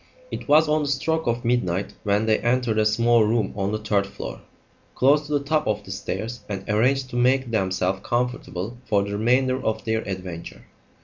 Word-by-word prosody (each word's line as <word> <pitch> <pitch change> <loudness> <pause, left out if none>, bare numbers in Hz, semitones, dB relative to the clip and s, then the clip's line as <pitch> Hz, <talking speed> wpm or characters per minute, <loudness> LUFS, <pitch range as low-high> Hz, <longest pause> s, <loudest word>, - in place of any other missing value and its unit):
It - - -6
was 155 +2 +5
on 155 +1 +2
the 145 - -1
stroke 160 +3 0
of 120 0 -1
midnight 100 -6 0
when 105 +1 +1
they 110 -1 +3
entered 120 -2 +1
a 105 - +4
small 115 +1 +4
room 110 -2 +1
on 100 0 -1
the 110 - 0
third 105 -2 0
floor, - - -7 0.5
close 145 +3 +3
to 150 - -3
the 145 -1 0
top 155 -2 +1
of 105 -1 -1
the 95 - -9
stairs, 110 +5 -4
and 100 -2 -5
arranged 130 +5 +1
to - - -6
make 125 0 +2
themselves 95 -2 0
comfortable 120 -3 -2
for 100 -2 +2
the 100 - -5
remainder 130 +4 +2
of 110 - -2
their 110 0 0
adventure. 90 -3 -6
115 Hz, 195 wpm, -24 LUFS, 100-130 Hz, 0.5 s, was